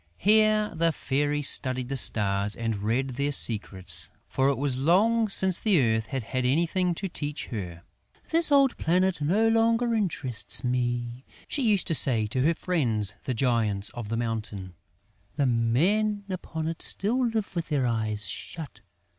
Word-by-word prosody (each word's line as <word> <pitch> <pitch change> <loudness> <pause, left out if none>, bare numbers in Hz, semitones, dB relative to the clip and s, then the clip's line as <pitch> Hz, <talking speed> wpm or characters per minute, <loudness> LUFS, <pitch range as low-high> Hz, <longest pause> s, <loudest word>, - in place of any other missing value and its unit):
Here 215 0 +3
the 165 0 +1
Fairy 145 0 -1
studied 130 -2 +4
the 135 - -4
stars 105 -4 0
and 115 -3 -3
read 120 +6 -1
their 140 +3 -2
secrets, 95 - +2 0.2
for 135 +1 +1
it 140 - -1
was 140 -2 0
long 215 +9 +2
since 190 -2 +4
the 205 -7 +3
Earth 110 -3 0
had 130 +1 -4
had 130 +3 -3
anything 170 +6 +1
to 195 - -4
teach 150 -4 -5
her. 90 -7 -7 0.5
"This 325 -2 +5
old 275 -3 +4
planet 180 0 0
no 200 +10 +2
longer 230 +1 +2
interests 165 - -3
me!" 120 0 -2 0.2
she 285 - -2
used 210 -6 +2
to - - -1
say 120 -7 +2
to 120 +5 -2
her 165 +5 +2
friends, 120 - -1
the 130 - -2
giants 110 -5 0
of 115 -3 -8
the 115 - -2
mountain. 110 -5 -4 0.6
"The 145 - 0
men 175 - +1
upon 160 -3 -5
it 165 0 -5
still 240 +6 0
live 220 -5 -3
with 170 -1 -3
their 140 -4 0
eyes 110 -3 -2
shut! 160 - -8
140 Hz, 165 wpm, -26 LUFS, 115-185 Hz, 0.6 s, This